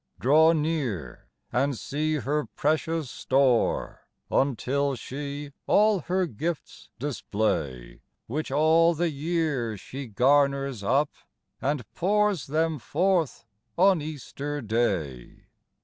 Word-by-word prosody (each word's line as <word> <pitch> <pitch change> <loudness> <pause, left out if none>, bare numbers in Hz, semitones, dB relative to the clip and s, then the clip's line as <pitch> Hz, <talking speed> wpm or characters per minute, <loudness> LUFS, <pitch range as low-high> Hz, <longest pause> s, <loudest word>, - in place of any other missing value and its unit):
" - - -37
Draw 160 +5 +5
near, 145 - -2 0.2
and 135 +2 +1
see 155 +5 -1
her 150 +2 -1
precious 155 -1 0
store 130 -3 +1 0.2
Until 140 +1 +1
she 140 +4 -6 0.2
all 210 -1 +4
her 185 +3 0
gifts 160 +4 -5
display, 100 - -2 0.2
Which 150 +7 -3
all 160 +4 +4
the 170 +1 0
year 145 -7 -1
she 135 +7 -8
garners 140 +1 +2
up, 135 +8 +2 0.5
And 140 -3 -1
pours 205 -2 +1
them 155 +1 0
forth 170 -2 0 0.3
on 185 -2 +5
Easter 145 -1 -5
Day. 100 - -2
145 Hz, 105 wpm, -26 LUFS, 125-160 Hz, 0.5 s, Draw